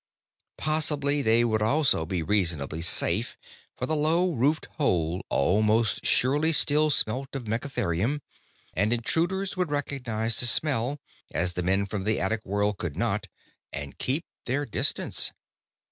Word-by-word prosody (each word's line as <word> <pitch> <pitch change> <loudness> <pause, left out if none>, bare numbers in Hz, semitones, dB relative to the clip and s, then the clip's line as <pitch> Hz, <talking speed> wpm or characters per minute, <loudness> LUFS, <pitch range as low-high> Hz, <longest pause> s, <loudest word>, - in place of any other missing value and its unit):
Possibly 150 -2 +1
they 115 0 +3
would 110 -2 0
also 115 - +2
be 90 -2 -2
reasonably 85 -6 0
safe, 90 +5 0 0.4
for 125 - -2
the 155 - 0
low 165 +4 +2
roofed 145 +4 +1
hole 90 - +1
almost 105 +7 +2
surely 145 +5 +3
still 150 0 +3
smelt 135 0 0
of 135 - -4
megatherium, 115 - -1 0.5
and 105 +4 +1
intruders 175 - 0
would 180 -3 -1
recognize 125 -6 -1
the 120 - +5
smell 135 0 +1 0.3
as 90 +4 0
the 90 - -2
men 95 +3 +1
from 100 -1 -4
the 110 +2 0
attic 110 +3 -1
world 100 0 -1
could 85 -5 -4
not - - -1 0.4
and 70 0 -7
keep 145 +6 -1 0.2
their 140 +4 0
distance. 115 - 0
115 Hz, 140 wpm, -27 LUFS, 100-145 Hz, 0.5 s, the